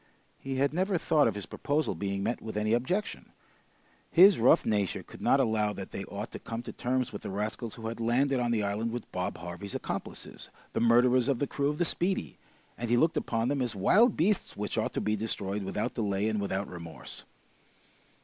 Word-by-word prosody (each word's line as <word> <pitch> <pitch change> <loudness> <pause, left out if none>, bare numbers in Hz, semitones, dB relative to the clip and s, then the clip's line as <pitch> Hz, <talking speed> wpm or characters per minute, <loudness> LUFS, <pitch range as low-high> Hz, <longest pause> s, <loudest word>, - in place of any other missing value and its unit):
He 135 0 -4
had 140 +2 +1
never 185 +2 +1
thought 155 -2 +3
of - - -1
his 105 - -5
proposal 150 -3 -1
being 100 +2 -3
met 120 - -1
with 110 -1 -5
any 105 +1 +1
objection. 180 - -2 0.8
His 190 - +7
rough 120 - +5
nature 105 -4 0
could - - -13
not 135 - +4
allow 110 -4 +1
that 95 -1 -7
they 100 - -5
ought 105 +2 -6
to - - -7
come 115 +1 -5
to - - -6
terms 130 -1 -1
with 100 - -6
the - - -6
rascals 105 +3 -3
who 115 - -9
had 115 +1 -4
landed 130 +4 +2
on 120 -1 0
the 115 -3 +1
island 105 +3 -1
with 120 0 -6
Bob 90 0 -3
Harvey's 90 +3 -7
accomplices, - - -6 0.2
the - - 0
murderers 120 +2 +4
of 140 -3 +2
the 145 - 0
crew 140 +1 -1
of 150 - -2
the 175 - +1
"Speedy," 185 +3 -1 0.4
and 120 -1 -3
he 120 - +4
looked 160 +6 +3
upon 115 0 0
them 140 0 0
as 120 -3 -1
wild 215 - +4
beasts 190 +5 +1
which 105 0 -3
ought 110 - -1
to - - -1
be 105 0 +1
destroyed 105 -2 -3
without 105 +5 -2
delay 100 -2 0
and 110 -2 0
without 100 0 -2
remorse. 85 -6 -8
115 Hz, 210 wpm, -29 LUFS, 105-135 Hz, 0.8 s, His